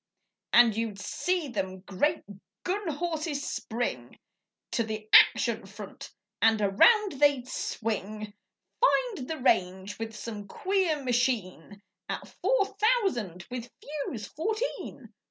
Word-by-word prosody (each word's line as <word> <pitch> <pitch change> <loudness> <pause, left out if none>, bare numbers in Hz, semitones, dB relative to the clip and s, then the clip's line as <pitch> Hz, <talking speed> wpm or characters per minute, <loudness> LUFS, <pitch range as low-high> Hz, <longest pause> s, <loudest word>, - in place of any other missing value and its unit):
And 235 -3 +6
you'd 225 -2 -2
see 360 - -1
them 190 -5 -3
great 290 - 0 0.4
gun 390 +2 -2
horses 310 -2 -2
spring 170 - -4 0.5
To 235 - +1
the 215 -1 -5
'action - - +6
front' - - -9 0.3
and 225 -1 +5
around 285 - +4
they'd 285 -4 +3
swing. 215 -3 -3 0.5
Find 480 - +2
the 320 - -2
range 190 -5 +1
with 225 -1 -5
some 210 -2 -7
queer 365 - 0
machine 230 -6 -1 0.3
'At - - -4
four - - +3
thousand 355 - +1
with 245 -1 -5
fuse 280 -7 -5
fourteen. 435 - -4
245 Hz, 115 wpm, -28 LUFS, 210-330 Hz, 0.5 s, And